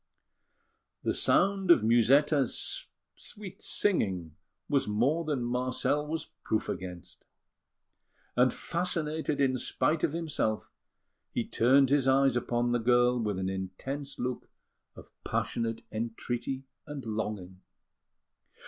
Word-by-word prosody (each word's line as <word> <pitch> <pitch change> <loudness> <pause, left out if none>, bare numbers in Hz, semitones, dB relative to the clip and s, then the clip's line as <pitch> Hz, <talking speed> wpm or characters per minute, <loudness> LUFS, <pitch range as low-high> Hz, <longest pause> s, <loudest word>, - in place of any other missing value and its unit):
The - - +1
sound 195 -2 +3
of 150 -11 +7
Musetta's 135 +4 +3 0.3
sweet 205 -3 -6
singing 95 - 0 0.3
was 140 -5 +1
more 125 +11 +1
than 145 -6 -1
Marcel 130 +4 0
was 160 +1 -4
proof 110 - -1
against; 90 -2 -7 1.1
and, 125 +1 +4
fascinated 160 -4 -1
in 130 -2 +2
spite 155 +5 0
of - - +2
himself, 155 -10 -2 0.6
he - - -1
turned 135 +3 +4
his 140 -2 +3
eyes 135 -1 +4
upon 120 0 0
the 120 - +2
girl 120 +1 +3
with 105 -4 -1
an 95 0 -2
intense 95 +10 -5
look 125 0 -4 0.5
of - - -14
passionate 115 -1 -2
entreaty 120 +4 -3 0.2
and 145 -3 -6
longing. 105 -4 -4
125 Hz, 110 wpm, -30 LUFS, 110-145 Hz, 1.1 s, of